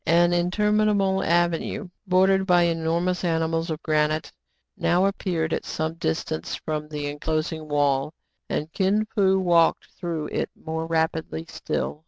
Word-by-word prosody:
An 175 +1 +4
interminable 200 +2 +2
avenue, 175 +4 0 0.2
bordered 190 +1 +3
by 175 -2 +5
enormous 170 +2 0
animals 165 0 0
of 160 0 -4
granite, 155 0 +1 0.4
now 180 +2 +2
appeared 175 -5 -1
at - - -1
some 160 +1 -3
distance 80 - -2
from 150 -1 -4
the 150 -1 -4
enclosing 155 +2 -2
wall; 145 -1 +1 0.4
and 155 +2 -3
Kin 200 +3 +2
Fo 190 -3 +3
walked 170 -3 +3
through 165 -4 -4
it - - -1
more 160 0 -4
rapidly 160 0 -1
still. 150 - -3
165 Hz, 135 wpm, -24 LUFS, 155-185 Hz, 0.4 s, by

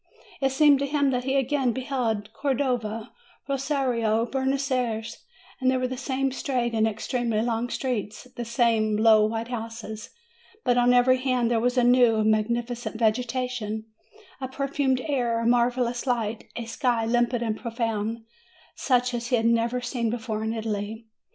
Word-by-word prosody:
It 270 - +3
286 265 - -6
MAY 305 - +6
seemed 285 -2 +7
to 280 - 0
him 285 -1 +2
that 250 -1 -1
he 265 +1 0
again 270 -2 +1
beheld 230 -5 -2
Cordova, 245 -4 -1 0.4
Rosario, 260 -5 0
Buenos 270 +2 -1
Ayres: 230 -3 -2 0.4
there 260 0 +3
were 255 0 0
the 260 - -4
same 265 +1 -1
straight 250 -3 -1
and 220 0 +3
ex 220 0 -5
tremely 235 -3 0
long 235 0 -1
streets, 230 -5 -3
the 240 - -4
same 230 -3 +1
low 215 -1 +5
white 225 +1 -3
houses, 225 -2 -6 0.5
but 245 - +2
on 245 0 +4
every 250 +1 +4
hand 255 -2 +1
there 230 - +3
was 245 +2 0
a 250 - +4
new 245 -2 +5
and 215 0 +3
magnificent 235 +1 -1
vege 230 +2 +1
tation, 245 -4 -3 0.6
a 260 - -2
perfumed 270 -1 0
air, 240 -5 0
a 230 - -2
marvelous 240 +1 +1
light, 225 -3 -1
a 235 - -4
sky 230 0 0
limpid 240 +1 +1
and 220 -2 -1
profound, 225 -1 -3 0.5
such 250 -1 +1
as 235 -1 -3
he 250 - +2
had 225 -1 0
never 235 +2 +2
seen 240 -1 -2
even 220 -2 -3
in 220 - -1
Italy. 220 0 -4
240 Hz, 170 wpm, -26 LUFS, 225-255 Hz, 0.6 s, seemed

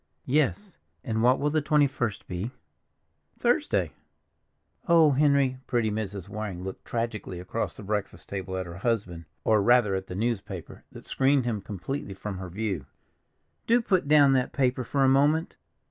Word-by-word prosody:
"Yes, 120 - 0 0.3
and 110 -1 -1
what 125 +3 +4
will 145 +1 +1
the 155 0 +2
twenty 150 0 +4
first 120 -6 -3
be?" 90 +5 -3 0.9
"Thursday." - - +1 1.0
"Oh, 165 -3 +6
Henry!" 140 -2 +3
Pretty 115 -3 +1
Mrs. 100 -3 -4
Waring 100 -3 -5
looked 95 0 -7
tragically 115 -6 -3
across 90 +6 -3
the - - -9
breakfast 105 0 -3
table 95 -1 -4
at 95 - -3
her 85 0 -8
husband, 95 -6 -2 0.2
or 110 -2 +3
rather 120 -2 +4
at 95 0 -3
the 90 - -6
newspaper 100 -5 -4
that - - -12
screened 135 -1 +2
him 110 -4 -1
completely 100 +2 -5
from 100 -1 -6
her 95 -1 -6
view. 95 -6 -3 0.8
"Do 235 +2 +5
put 185 -9 +1
down 145 -2 +6
that 130 -1 +1
paper 130 -2 +1
for 135 +3 0
a - - +5
moment. 145 +5 +3
115 Hz, 160 wpm, -27 LUFS, 95-135 Hz, 1.0 s, Oh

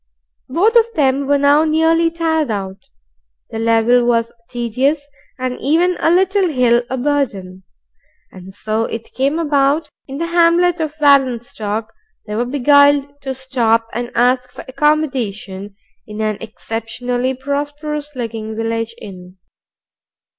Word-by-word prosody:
Both 395 - +2
of 465 0 +4
them 275 -1 +1
were 285 0 +3
now 285 +2 +4
nearly 325 +1 +2
tired 320 -3 -1
out, 195 -2 -5 0.6
the 225 - -4
level 230 +2 +3
was 230 -1 +1 0.2
tedious, 260 +5 -1 0.3
and 255 -1 -4
even 340 +6 +2
a - - +2
little 380 +2 +3
hill 245 -4 +3
a 260 - -2
burden; 240 -10 -2 0.7
and 185 0 -12
so 215 +3 -2
it 230 0 -7
came 275 +4 0
about 290 -1 +2
that - - -25 0.2
in 270 0 -7
the 335 - -2
hamlet 340 +1 +3
of 310 -1 -3
Wallenstock 235 -6 +1 0.4
they 210 - -6
were 235 +3 0
beguiled 285 +2 +3
to 265 -1 -4
stop 240 -4 +1
and 240 +1 -4
ask 250 +1 +2
for - - -10
accommodation 250 -9 -1 0.3
in 210 0 -8
an 215 -1 -1
exceptionally 245 +3 -3
prosperous 290 +2 -4
looking 225 -3 -5
village 225 0 -3
inn. 185 -2 -11
260 Hz, 135 wpm, -17 LUFS, 225-295 Hz, 0.7 s, of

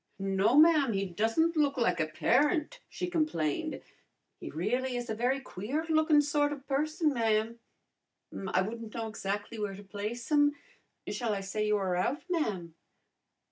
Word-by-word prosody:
"No, 195 +6 +2
ma'am, 305 -6 +6
he 195 0 0
doesn't 225 - +1
look 285 -3 +2
like 235 -7 +1
a 155 - +1
parent," 300 - +1
she 360 - -4
complained. 310 - -1 0.6
"He - - -7
really 245 - -1
is 245 -1 -4
a - - 0
very 250 +5 0
queer 270 - -4
lookin' 310 -1 +4
sort 290 0 +1
of 280 -2 -7
person, 305 +3 +1
ma'am. 225 -1 0 0.9
I 185 - +3
wouldn't 225 +1 -6
know 225 -1 -3
exactly 205 +1 -4
where 205 -2 -3
to 200 - -11
place 210 +6 -5
him. 290 -1 +4 0.5
Shall 230 -4 -1
I 195 - -3
say 210 +2 -2
you 210 0 +3
are 190 -3 -1
out, 240 - -1
ma'am?" 195 - -1
235 Hz, 160 wpm, -30 LUFS, 205-295 Hz, 0.9 s, ma'am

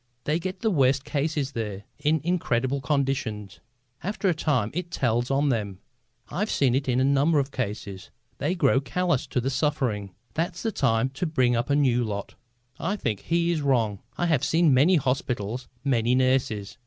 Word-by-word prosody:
"They 150 +6 0
get 185 +2 -5
the 220 - +2
worst 135 -4 +2
cases 145 -2 -1
there, 105 -5 -4 0.2
in 155 +1 +1
incredible 140 -6 0
conditions. 130 - -2 0.4
After 200 +4 -2
a - - +3
time 135 -9 0
it 175 +1 -3
tells 120 -7 0
on 140 +1 +2
them. 105 -6 -1 0.5
I've 210 +4 -2
seen 130 -4 +2
it 135 +1 0
in 125 0 +2
a - - +3
number 140 +4 +3
of 140 -1 0
cases. 100 -6 -5 0.3
They 165 +6 0
grow 135 -5 +3
calloused 170 +2 -1
to 125 0 0
suffering. 125 - -1 0.2
That's 170 +2 -2
the 225 - 0
time 125 - +1
to 140 +7 -3
bring 130 -6 +2
up 120 +3 -1
a 140 - +3
new 125 -4 +3
lot." 100 -3 -4 0.5
I 190 +5 -1
think 110 - -2
he 170 0 +1
is 160 -3 0
wrong. 115 -8 +1 0.2
I 175 - +1
have 160 -7 +2
seen 160 -3 +3
many 150 +9 +5
hospitals, 125 -4 -1 0.2
many 120 -3 +2
nurses. 125 -4 0
135 Hz, 180 wpm, -26 LUFS, 120-155 Hz, 0.5 s, many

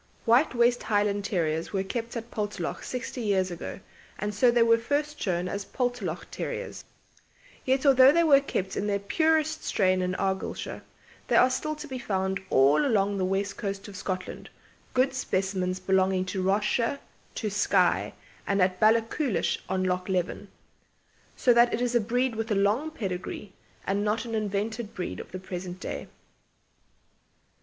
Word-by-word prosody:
White 245 +4 +4
West 240 +1 +3
Highland 205 -1 +1
Terriers 165 -5 -1
were 195 -1 0
kept 235 +4 -4
at 230 +1 -7
Poltalloch 205 -5 -3
sixty 250 0 -5
years 190 -4 +1
ago, 175 - -6 0.4
and 210 +1 -3
so 240 +5 +4
they 240 -1 +4
were 230 0 +4
first 290 +5 -2
shown 180 -2 0
as 200 +2 -3
Poltalloch 245 -10 -2
Terriers. - - -5 0.8
Yet 265 +2 +1
although 265 -1 +8
they 335 +3 +3
were 285 -4 +7
kept 190 -8 -3
in 205 - -1
their 200 -1 +1
purest 315 +10 +1
strain 185 -2 +2
in 180 0 -1
Argyllshire, 190 0 -3 0.5
they - - +2
are 255 - +6
still 305 +4 -2
to 305 0 -8
be 260 -2 -5
found 190 -4 -1
all 135 - +4
along 205 -6 +1
the 185 - +1
west 195 +2 -1
coast 200 0 -4
of 200 - -10
Scotland, 185 -1 -5 0.5
good 260 +1 +3
specimens 190 -6 -1
belonging 190 0 +2
to 185 +1 -3
Ross 195 +3 +2
shire, 230 +5 0 0.4
to 215 -3 -2
Skye, 210 - +2 0.3
and 200 0 +1
at 185 0 +2
Ballachulish 225 - +2
on 185 0 0
Loch 180 0 -1
Leven, 185 +2 -1 0.9
so 245 - +4
that 235 0 +5
it - - -4
is 245 0 0
a 240 - +4
breed 245 +3 0
with 225 +1 -3
a 210 - +1
long 210 +10 +2
pedigree 195 - -5 0.3
and 200 +1 0
not 215 +3 0
an 230 - -6
invented 215 +1 -2
breed 180 -3 -4
of - - -9
the 185 - -5
present 180 -1 -6
day. - - -5
205 Hz, 165 wpm, -27 LUFS, 190-245 Hz, 0.9 s, although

